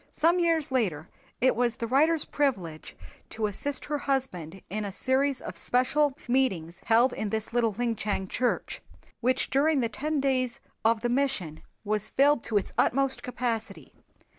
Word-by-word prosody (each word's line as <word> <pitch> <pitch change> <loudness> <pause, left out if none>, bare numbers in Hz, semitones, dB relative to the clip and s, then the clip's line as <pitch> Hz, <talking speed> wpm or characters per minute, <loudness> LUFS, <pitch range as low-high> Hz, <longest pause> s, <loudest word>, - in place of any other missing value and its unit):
Some 340 +3 +3
years 330 -5 +1
later 180 - 0 0.3
it 260 - +4
was 240 -1 +1
the 230 - -3
writer's 300 +6 +3
privilege 190 - -2 0.3
to 220 -1 -2
assist 255 +7 -2
her 295 -1 -2
husband 195 - -2
in 215 +2 -3
a 200 - -4
series 265 +5 +1
of - - -7
special 265 +3 +2
meetings 195 -10 0
held 240 +3 +4
in 215 - -3
this 220 +1 -3
little 230 -3 +2
Linchang 215 -4 -1
church, 250 +5 -1 0.4
which 255 +1 +1
during 290 +2 +3
the 230 - 0
ten 300 +6 -2
days 260 -2 0 0.2
of 225 0 +3
the 240 - 0
"Mission" 240 - -1 0.2
was 215 0 -1
filled 285 -2 +3
to 220 - +1
its 200 - -2
utmost 270 +1 +2
capacity. 235 -3 -4
245 Hz, 160 wpm, -28 LUFS, 215-275 Hz, 0.4 s, it